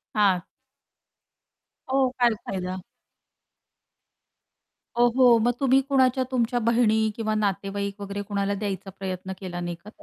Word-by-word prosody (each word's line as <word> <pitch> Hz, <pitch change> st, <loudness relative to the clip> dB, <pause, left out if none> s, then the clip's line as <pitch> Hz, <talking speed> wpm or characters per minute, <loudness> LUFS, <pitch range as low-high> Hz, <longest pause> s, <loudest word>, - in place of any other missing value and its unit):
हां. 195 Hz, -4 st, +3 dB, 1.5 s
हो, 265 Hz, -1 st, +3 dB
काय 240 Hz, -2 st, +4 dB
फायदा? 185 Hz, -1 st, -4 dB, 2.2 s
ओहो! 240 Hz, 0 st, +5 dB
मग 240 Hz, +2 st, +2 dB
तुम्ही 270 Hz, 0 st, +4 dB
कोणाच्या 260 Hz, -1 st, +3 dB
तुमच्या 245 Hz, -1 st, +1 dB
बहिणी 220 Hz, -1 st, +2 dB
किंवा 220 Hz, -1 st, -1 dB
नातेवाईक 200 Hz, 0 st, -2 dB
वगैरे 200 Hz, 0 st, -4 dB
कोणाला 200 Hz, 0 st, -2 dB
द्यायचा 195 Hz, -1 st, -4 dB
प्रयत्न 190 Hz, 0 st, -5 dB
केला 180 Hz, -2 st, -6 dB
नाही 175 Hz, -1 st, -4 dB
का? 190 Hz, +5 st, -14 dB
210 Hz, 115 wpm, -25 LUFS, 195-240 Hz, 2.2 s, ओहो